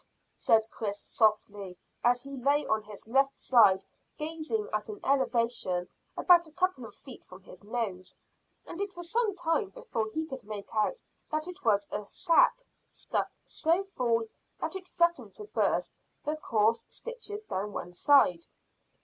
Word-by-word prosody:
said 220 -1 +3
Chris 205 -2 -3
softly, 205 -4 0 0.3
as 245 +1 +3
he 275 0 -7
lay 280 +3 +2
on 220 0 +1
his 210 -1 -10
left 270 +4 +2
side 205 -7 +5 0.3
gazing 325 +8 -2
at - - -2
an 415 -2 -6
elevation 235 -9 +1 0.3
about 345 -2 +6
a - - -15
couple 360 -8 0
of 205 - -15
feet 265 -4 -12
from 185 +1 -14
his 185 -1 -14
nose; 205 -5 -4 0.5
and 345 - -6
it 395 -3 -4
was 345 -1 -7
some 450 -4 +1
time 335 +3 0
before 465 - -3
he 315 +8 -3
could 265 -5 -7
make 205 -1 -8
out 220 - 0 0.3
that 310 +2 -1
it 360 - -9
was 205 -3 +3
a - - -2
sack, 355 - +3 0.2
stuffed - - -3
so 335 +5 +1
full 230 -2 +2 0.4
that - - -3
it 380 -1 -6
threatened 340 -1 +1
to 430 - -6
burst 415 - 0 0.3
the 300 +1 0
coarse 225 -6 +2
stitches 450 -3 -7
down 205 - -3
one 175 -3 -6
side. 180 -7 +4
260 Hz, 160 wpm, -30 LUFS, 215-340 Hz, 0.5 s, about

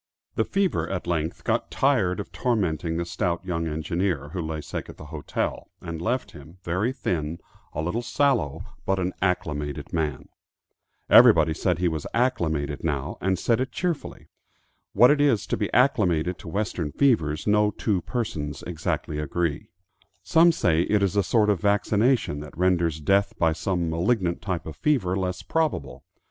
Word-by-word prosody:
The - - 0
fever 195 -2 0
at 95 -2 -3
length 85 -2 -2
got - - 0
tired 110 -9 +1
of 100 - -6
tormenting 85 - -1
the 85 - -1
stout 85 +1 -2
young 85 -3 -2
engineer, 80 -1 -2
who 90 +3 -4
lay 80 -1 -4
sick - - -6
at - - -11
the - - -10
hotel, 75 - -3
and 85 -1 -6
left 125 +7 -1
him, 75 +5 -13
very 90 +8 0
thin, 85 - -2 0.4
a 80 - -2
little 90 +8 -1
sallow 120 - 0 0.2
but 95 - 0
an 90 0 -1
"acclimated" 75 -6 -2
man. 75 -4 -2 0.8
Everybody 80 -1 +7
said 90 +1 0
he 90 0 +1
was 80 -3 -3
"acclimated" 80 - 0
now, 75 0 -2
and 95 0 +1
said 115 +6 +1
it 130 - -2
cheerfully. 175 -4 -3 0.7
What 120 +6 +7
it 145 -1 +3
is 125 -9 +3
to - - -1
be 105 - -2
acclimated 90 - +2
to - - -11
western 90 -4 -2
fevers 80 - +1
no 105 0 +3
two 105 -2 -1
persons 80 -13 -4
exactly 80 -2 -3
agree. 75 0 -2 0.5
Some 165 - +5
say 85 - +2
it 105 +3 +2
is 100 0 0
a 100 - +4
sort 105 +1 +2
of 95 -5 -1
vaccination 105 - +2
that 75 0 -10
renders 85 -3 +1
death 100 +5 +1
by 80 -1 +2
some 85 -1 -1
malignant 85 +1 0
type 90 -4 -3
of 80 - -7
fever 120 -12 +1
less 90 -1 -2
probable. 155 - -2
90 Hz, 165 wpm, -25 LUFS, 80-105 Hz, 0.8 s, Everybody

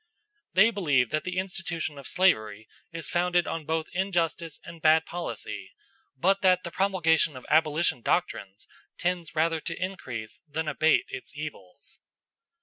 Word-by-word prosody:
"They 215 +5 +6
believe 145 - +2
that 155 +2 -1
the 185 0 -3
institution 170 -5 -3
of 140 - -9
slavery 110 - +2 0.2
is 165 -1 -5
founded 175 0 +2
on 160 -2 -4
both 160 0 0
injustice 170 -4 -1
and 165 -1 -11
bad 160 +1 +5
policy, 175 0 -5 0.4
but 195 +7 +2
that 185 -1 +4
the 170 - -5
promulgation 165 -7 +2
of 130 - -11
abolition 155 -3 +3
doctrines 105 - -1 0.3
tends 175 -2 -2
rather 160 +1 +2
to - - -5
increase 130 - -5
than 155 +2 -3
abate 155 +1 +3
its 395 -1 -8
evils." - - -8
165 Hz, 145 wpm, -28 LUFS, 155-180 Hz, 0.4 s, They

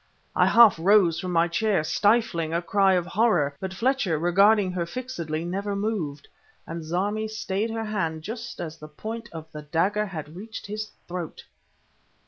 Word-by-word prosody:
I - - +4
half 230 -7 +7
rose 180 -2 +4
from 185 - -4
my 170 0 +3
chair, 190 0 +1
stifling 170 -2 +1
a 170 - +1
cry 195 +1 +3
of 175 -1 0
horror; 175 -11 +2
but 190 - -4
Fletcher, 225 - +1
regarding 195 +4 +4
her 175 -2 -2
fixedly, 170 -8 -4
never 200 +3 -2
moved... 200 -9 -3 0.4
and 165 +1 -6
Zarmi 200 +7 -1
stayed 215 0 -2
her 225 0 -3
hand 165 -7 -2
just 235 +5 -6
as 165 -2 -5
the 155 - -9
point 225 +9 -7
of 160 -2 -7
the 150 - -7
dagger 180 +8 0
had 155 -4 -7
reached 220 +4 -8
his 215 +1 -4 0.2
throat! 175 -2 -6
190 Hz, 165 wpm, -25 LUFS, 165-215 Hz, 0.4 s, half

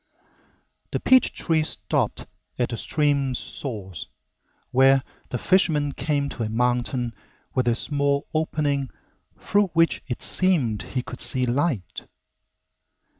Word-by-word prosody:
The - - -2
peach 260 0 +4
trees 160 -2 0
stopped - - -1 0.3
at 125 - 0
the 115 - -4
stream's 140 -3 +1
source, 100 - -4 0.6
where 135 +1 +5 0.3
the 125 - -2
fisherman 155 -4 +2
came 145 -1 -1
to 120 - -7
a 110 - -1
mountain 120 +1 0 0.4
with 130 -2 0
a 120 - +3
small 140 +2 0
opening 145 -4 0 0.5
through 205 0 +2
which 165 0 +3
it 125 - -4
seemed 150 - +3
he 125 -2 -4
could 125 - -8
see 125 -1 +3
light. 125 - -2
135 Hz, 125 wpm, -24 LUFS, 125-150 Hz, 0.6 s, where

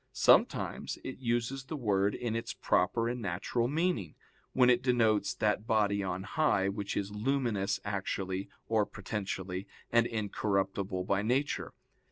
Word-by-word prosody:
Sometimes - - +3
it 130 - -6
uses 120 +2 -1
the 155 - -5
word 100 -6 +1
in 120 -2 -2
its 115 - -3
proper 115 0 +1
and 120 +1 -3
natural 100 +5 -1
meaning, 145 - -1 0.4
when 125 -1 +4
it 125 -1 +5
denotes 115 -4 +2
that 105 +1 0
body 100 -2 +2
on 95 -1 -3
high 100 -4 +2
which 100 0 -3
is 100 0 -2
luminous 110 -3 0
actually 95 -1 -2 0.2
or 110 -2 +3
potentially, 95 -2 -4 0.2
and 120 0 +4
incorruptible 100 -3 -1
by 95 +1 +1
nature. 130 +7 -1
105 Hz, 140 wpm, -31 LUFS, 100-120 Hz, 0.4 s, it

